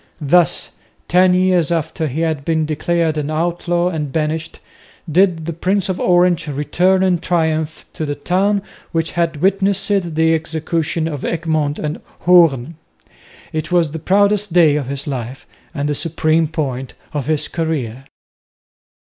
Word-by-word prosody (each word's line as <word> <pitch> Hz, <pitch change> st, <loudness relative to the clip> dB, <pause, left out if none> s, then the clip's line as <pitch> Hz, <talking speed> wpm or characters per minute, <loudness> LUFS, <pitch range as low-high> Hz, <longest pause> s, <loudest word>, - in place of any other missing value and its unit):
Thus, 165 Hz, +3 st, +2 dB, 0.4 s
ten 180 Hz, +1 st, +4 dB
years 180 Hz, -3 st, +2 dB
after 160 Hz, -1 st, -1 dB
he 150 Hz, +4 st, -3 dB
had 160 Hz, -4 st, -1 dB
been 160 Hz, 0 st, 0 dB
declared 160 Hz, +1 st, 0 dB
an 150 Hz, 0 st, -3 dB
outlaw 175 Hz, +2 st, 0 dB
and 150 Hz, -5 st, -3 dB
banished, 155 Hz, +2 st, -2 dB, 0.5 s
did 170 Hz, 0 st, +2 dB
the 170 Hz, -, -3 dB
Prince 190 Hz, +4 st, 0 dB
of 185 Hz, -, -2 dB
Orange 175 Hz, -2 st, +3 dB
return 180 Hz, +6 st, +1 dB
in 180 Hz, -2 st, +2 dB
triumph 160 Hz, -3 st, -1 dB
to 155 Hz, -, -4 dB
the 145 Hz, -, -2 dB
town 195 Hz, +5 st, 0 dB, 0.3 s
which 165 Hz, 0 st, 0 dB
had 170 Hz, -2 st, -1 dB
witnessed 195 Hz, +1 st, +1 dB, 0.3 s
the 160 Hz, +1 st, +3 dB
execution 160 Hz, 0 st, -1 dB
of 145 Hz, -4 st, -5 dB
Egmont 155 Hz, -3 st, -1 dB
and 150 Hz, 0 st, -4 dB, 0.2 s
Hoorn. 165 Hz, -5 st, +4 dB, 0.8 s
It 155 Hz, +2 st, -3 dB
was 170 Hz, -4 st, +2 dB
the 160 Hz, -, -5 dB
proudest 200 Hz, +3 st, +2 dB
day 165 Hz, -5 st, +5 dB
of 145 Hz, -4 st, -2 dB
his 140 Hz, +1 st, -4 dB
life 130 Hz, -2 st, -5 dB, 0.3 s
and 140 Hz, +1 st, -3 dB
the 150 Hz, -, 0 dB
supreme 160 Hz, +1 st, +1 dB
point 135 Hz, -5 st, -4 dB, 0.2 s
of 145 Hz, -4 st, -3 dB
his 155 Hz, -2 st, 0 dB
career. 135 Hz, -7 st, -3 dB
160 Hz, 150 wpm, -18 LUFS, 150-175 Hz, 0.8 s, day